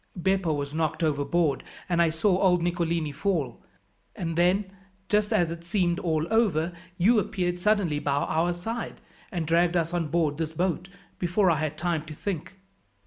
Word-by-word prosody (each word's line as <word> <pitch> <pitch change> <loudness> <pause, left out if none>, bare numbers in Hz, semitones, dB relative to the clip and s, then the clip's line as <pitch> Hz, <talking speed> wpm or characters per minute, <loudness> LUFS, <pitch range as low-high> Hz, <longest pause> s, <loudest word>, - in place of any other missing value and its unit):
Beppo 190 -2 +1
was 145 -1 -2
knocked 160 +1 -1
overboard, 150 +1 +1 0.2
and 175 -1 +2
I 170 - +4
saw 180 +5 +2
old 180 -3 +4
Nicolini 170 -3 0
fall; 150 - -1 0.5
and 165 -2 -3
then, 185 +3 +2 0.4
just 210 0 +2
as 175 -7 +2
it 170 0 -7
seemed 175 -1 +1
all 160 -3 0
over, 180 -7 +2 0.2
you 215 +5 +5
appeared 180 -2 -1
suddenly 190 -6 +2
by 145 -1 0
our 160 +4 +1
side, 225 +7 -5 0.3
and 170 -3 -2
dragged 170 +2 +3
us 165 0 -1
on 170 -3 0
board 155 -1 0
this 160 -1 -2
boat 180 +2 -1 0.3
before 180 +1 +3
I 160 - +2
had 155 -1 -2
time 170 -1 0
to 155 -1 -8
think." 195 +1 -4
170 Hz, 170 wpm, -27 LUFS, 155-185 Hz, 0.5 s, you